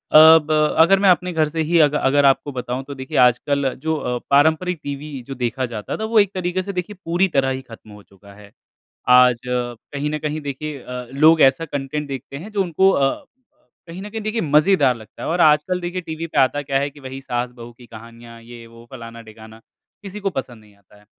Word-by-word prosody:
अब 160 Hz, 0 st, +8 dB, 0.3 s
अगर 190 Hz, +4 st, +5 dB
मैं 195 Hz, -1 st, +4 dB
अपने 180 Hz, 0 st, +2 dB
घर 160 Hz, -1 st, +1 dB
से 160 Hz, +1 st, -3 dB
ही 170 Hz, -1 st, +3 dB
अग 145 Hz, -, -2 dB
अगर 140 Hz, +1 st, +3 dB
आपको 135 Hz, +1 st, +2 dB
बताऊँ 125 Hz, 0 st, -5 dB
तो 140 Hz, -, -6 dB
देखिए 130 Hz, 0 st, -6 dB
आजकल 130 Hz, +2 st, +2 dB
जो 160 Hz, 0 st, +1 dB
अ, 125 Hz, -4 st, -3 dB
पारंपरिक 160 Hz, +5 st, +2 dB
टीवी 145 Hz, +1 st, -6 dB, 0.2 s
जो 135 Hz, -, -6 dB
देखा 125 Hz, +1 st, -2 dB
जाता 105 Hz, -2 st, -5 dB
था 220 Hz, -, -5 dB
वो 220 Hz, -, +6 dB
एक 200 Hz, -2 st, +2 dB
तरीके 185 Hz, 0 st, -2 dB
से 200 Hz, +1 st, -6 dB
देखिए 180 Hz, +3 st, -5 dB
पूरी 175 Hz, +3 st, +1 dB
तरह 135 Hz, -1 st, +2 dB
ही 130 Hz, 0 st, -3 dB
ख़त्म 110 Hz, -1 st, -13 dB
हो 105 Hz, 0 st, -14 dB
चुका 100 Hz, +1 st, -19 dB
है। 100 Hz, 0 st, -16 dB, 0.6 s
आज 125 Hz, -1 st, +6 dB
कहीं 125 Hz, +4 st, -4 dB
न 150 Hz, -, -2 dB
कहीं 150 Hz, +1 st, -4 dB
देखिए 145 Hz, +1 st, -6 dB
अ, 125 Hz, -1 st, -7 dB
लोग 155 Hz, +4 st, +4 dB
ऐसा 135 Hz, +5 st, +4 dB
कंटेंट 145 Hz, 0 st, -4 dB
देखते 135 Hz, 0 st, -7 dB
हैं 190 Hz, +9 st, -10 dB
जो 205 Hz, -2 st, 0 dB
उनको 190 Hz, +2 st, +2 dB
अ, 140 Hz, -, 0 dB, 0.6 s
कहीं 170 Hz, +3 st, -9 dB
न 205 Hz, -, -8 dB
कहीं 220 Hz, +1 st, -6 dB
देखिए 215 Hz, +2 st, -2 dB
मज़ेदार 150 Hz, -3 st, +3 dB
लगता 110 Hz, -2 st, -12 dB
है। -, -, -3 dB
और 175 Hz, +2 st, 0 dB
आजकल 155 Hz, +4 st, +3 dB
देखिए 175 Hz, +1 st, -4 dB
टीवी 165 Hz, -1 st, -6 dB
पे -, -, -7 dB
आता 135 Hz, +2 st, +2 dB
क्या 135 Hz, -1 st, -1 dB
है 140 Hz, +1 st, -2 dB
कि 145 Hz, -, -17 dB
वहीं 135 Hz, 0 st, -8 dB
सास-बहू 120 Hz, -2 st, -5 dB
की 125 Hz, -, -15 dB
कहानियाँ 115 Hz, 0 st, -13 dB
ये 115 Hz, 0 st, -12 dB
वो 115 Hz, 0 st, -16 dB
फ़लाना-डिगाना, 115 Hz, -2 st, -12 dB, 0.4 s
किसी 200 Hz, +1 st, -8 dB
को 200 Hz, -1 st, -1 dB
पसंद 130 Hz, -, -7 dB
नहीं 105 Hz, -1 st, -22 dB
आता 100 Hz, +1 st, -24 dB
है। 105 Hz, -, -24 dB
140 Hz, 220 wpm, -20 LUFS, 125-165 Hz, 0.6 s, अब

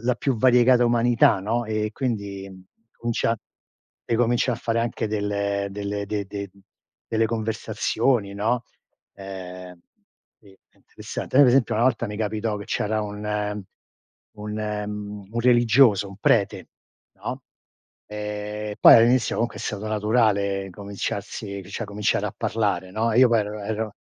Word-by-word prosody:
la 125 Hz, 0 st, +2 dB
più 135 Hz, 0 st, -1 dB
variegata 125 Hz, +1 st, +5 dB
umanità, 120 Hz, -3 st, +3 dB
no, 115 Hz, +5 st, -1 dB
e 110 Hz, 0 st, -1 dB
quindi 100 Hz, -7 st, -3 dB, 0.5 s
comincia 115 Hz, -1 st, -1 dB, 0.7 s
e 115 Hz, -, 0 dB
comincia 120 Hz, +2 st, +2 dB
a -, -, -2 dB
fare 115 Hz, 0 st, -1 dB
anche 115 Hz, -1 st, -2 dB
delle 100 Hz, -1 st, -1 dB
delle 100 Hz, 0 st, -4 dB
de 100 Hz, 0 st, -3 dB
de 100 Hz, 0 st, -6 dB
mhmm, 100 Hz, -, -22 dB, 0.5 s
delle 115 Hz, 0 st, +1 dB
conversazioni, 110 Hz, 0 st, -1 dB
no; 115 Hz, +4 st, 0 dB, 0.5 s
ehm, 90 Hz, -2 st, -9 dB, 0.6 s
sì -, -, -21 dB, 0.2 s
è -, -, -33 dB
interessante. -, -, -6 dB
Noi 140 Hz, 0 st, +8 dB
per 125 Hz, -, +5 dB
esempio 130 Hz, -3 st, +3 dB
una 115 Hz, +2 st, +2 dB
volta 125 Hz, -2 st, +1 dB
mi 105 Hz, -1 st, -6 dB
capitò 110 Hz, 0 st, -1 dB
che 100 Hz, -, -8 dB
c'era 110 Hz, +1 st, -1 dB
un 105 Hz, 0 st, -3 dB, 0.7 s
un 105 Hz, 0 st, -7 dB
mhmm, 105 Hz, -1 st, -5 dB
un 115 Hz, -, -1 dB
religioso, 120 Hz, -3 st, +5 dB
un 95 Hz, -, -11 dB
prete, 100 Hz, -4 st, +1 dB, 0.5 s
no. -, -, -6 dB, 0.6 s
Ehm, 105 Hz, 0 st, -5 dB
poi -, -, +10 dB
all'inizio 120 Hz, +2 st, +4 dB
comunque 115 Hz, 0 st, -2 dB
è -, -, -7 dB
stato 105 Hz, 0 st, -4 dB
naturale 105 Hz, -3 st, +1 dB
cominciarsi 100 Hz, +1 st, -5 dB
cioè 110 Hz, +3 st, -4 dB
cominciare 105 Hz, 0 st, -1 dB
a -, -, -6 dB
parlare, 100 Hz, -5 st, -1 dB
no. 115 Hz, +3 st, 0 dB
Io 125 Hz, +2 st, +6 dB
poi 115 Hz, -2 st, +3 dB
ero 105 Hz, 0 st, -4 dB
ero 110 Hz, +1 st, -3 dB
105 Hz, 145 wpm, -24 LUFS, 100-115 Hz, 0.7 s, poi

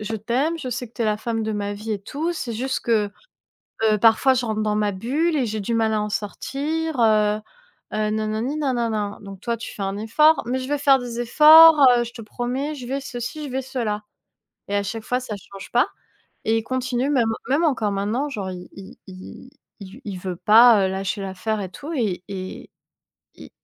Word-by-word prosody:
je 215 Hz, +1 st, -4 dB
t'aime, 255 Hz, +10 st, -1 dB
je 265 Hz, -, -5 dB
sais 245 Hz, 0 st, -4 dB
que 230 Hz, -, -32 dB
tu 235 Hz, -, -2 dB
es -, -, +1 dB
la 215 Hz, -1 st, +1 dB
femme 225 Hz, +1 st, -3 dB
de 220 Hz, -, -2 dB
ma 205 Hz, -1 st, -3 dB
vie 215 Hz, +2 st, -5 dB
et 205 Hz, -, -2 dB
tout, 305 Hz, -, -3 dB
c'est 260 Hz, -8 st, -4 dB
juste 255 Hz, +4 st, -2 dB
que, 215 Hz, -3 st, +1 dB, 0.7 s
heu, 215 Hz, -1 st, +3 dB
parfois, 225 Hz, +5 st, +4 dB
je 250 Hz, -1 st, -1 dB
rentre 215 Hz, -1 st, -1 dB
dans 210 Hz, -1 st, 0 dB
ma 210 Hz, -1 st, +1 dB
bulle 290 Hz, -, 0 dB
et 270 Hz, -, +1 dB
j'ai 215 Hz, 0 st, -3 dB
du 230 Hz, +4 st, -2 dB
mal 225 Hz, -1 st, +1 dB
à 215 Hz, -, +1 dB
en 210 Hz, -, -2 dB
sortir», 285 Hz, +9 st, -3 dB
heu, 215 Hz, -2 st, +3 dB, 0.6 s
heu, 215 Hz, 0 st, 0 dB
nanani, 220 Hz, +5 st, -2 dB
nanana. 230 Hz, -8 st, -1 dB
Donc 195 Hz, -2 st, -10 dB
toi, 235 Hz, +2 st, -2 dB
tu 230 Hz, -, -8 dB
fais 205 Hz, -, -6 dB
un 195 Hz, +1 st, -3 dB
effort, 300 Hz, +9 st, +3 dB
«Mais 250 Hz, +2 st, -1 dB
je 260 Hz, 0 st, -5 dB
vais 290 Hz, 0 st, 0 dB
faire 275 Hz, -1 st, +5 dB
des 240 Hz, -2 st, -5 dB
efforts, 310 Hz, +6 st, +8 dB, 0.2 s
heu, 240 Hz, -, +1 dB
je 235 Hz, -, -9 dB
te 235 Hz, -, -9 dB
promets», 250 Hz, +7 st, -3 dB
je 255 Hz, -4 st, -8 dB
vais 270 Hz, +3 st, -2 dB
ceci, 270 Hz, +3 st, -6 dB
je 285 Hz, -, -6 dB
vais 265 Hz, +1 st, -2 dB
cela. 235 Hz, -5 st, -3 dB, 0.7 s
Et 205 Hz, -, -1 dB
à 200 Hz, -, +1 dB
chaque 220 Hz, +3 st, -5 dB
fois, 250 Hz, +2 st, -1 dB
ça 230 Hz, -5 st, -6 dB
change 195 Hz, 0 st, -12 dB
pas. 245 Hz, -, +3 dB, 0.6 s
Et 225 Hz, +1 st, +2 dB
il 225 Hz, -, -2 dB
continue 255 Hz, +2 st, -1 dB
même 240 Hz, -5 st, +2 dB, 0.2 s
même 285 Hz, +5 st, +2 dB
encore 250 Hz, -10 st, +1 dB
maintenant, 210 Hz, +8 st, -1 dB
genre 195 Hz, -8 st, -4 dB
il 180 Hz, 0 st, -9 dB
il 195 Hz, -1 st, -12 dB
il 185 Hz, +6 st, -11 dB, 0.3 s
il 190 Hz, -2 st, -10 dB
v 260 Hz, -, -13 dB
il 195 Hz, -3 st, -5 dB
veut 180 Hz, -1 st, -4 dB
pas, 220 Hz, +1 st, +6 dB
heu, -, -, -2 dB
lâcher 195 Hz, +2 st, -3 dB
l'affaire 200 Hz, +3 st, -3 dB
et 190 Hz, -, -5 dB
tout 295 Hz, -, -7 dB
et 205 Hz, -9 st, -1 dB
et 185 Hz, -1 st, -7 dB, 0.7 s
et -, -, -12 dB
225 Hz, 225 wpm, -22 LUFS, 210-260 Hz, 0.7 s, efforts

